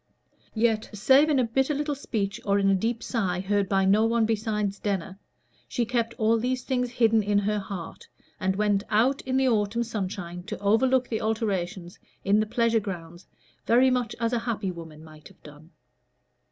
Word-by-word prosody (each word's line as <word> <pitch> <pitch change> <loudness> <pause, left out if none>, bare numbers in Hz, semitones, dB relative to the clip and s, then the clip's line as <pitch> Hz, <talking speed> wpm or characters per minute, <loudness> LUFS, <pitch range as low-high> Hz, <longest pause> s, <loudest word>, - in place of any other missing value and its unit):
Yet, 220 -1 +1
save 265 +9 +4
in 295 - +3
a 255 - +3
bitter 265 +5 0
little 295 +1 -1
speech, 210 -7 -3
or 200 0 +2
in 195 -1 +3
a - - +4
deep 225 +4 -1
sigh, 190 -7 -1
heard 200 0 0
by 195 -1 +2
no 205 +3 +4
one 230 0 +2
besides 210 -2 -1
Denner, 195 -1 -3 0.5
she 240 - -1
kept 235 -1 -1
all 225 +1 +2
these 250 +1 -1
things 250 -2 -1
hidden 225 -2 +3
in 205 0 +1
her 205 +1 +1
heart, 190 -4 -8 0.3
and 190 0 0
went 205 -1 +1
out 245 +6 +2
in 260 0 +1
the 265 0 +3
autumn 225 0 +1
sunshine 190 -5 -5
to - - -5
overlook 250 +5 +2
the 220 -1 -3
alterations 195 -5 -2 0.3
in 200 +2 +4
the 215 - 0
pleasure 230 0 +2
grounds 175 -4 -8 0.4
very 255 +3 +5
much 245 -3 -1
as 230 0 0
a 240 - +1
happy 220 -5 -3
woman 160 -3 -10
might 155 -1 -14
have - - -22
done. 150 +2 -14
215 Hz, 185 wpm, -26 LUFS, 195-235 Hz, 0.5 s, very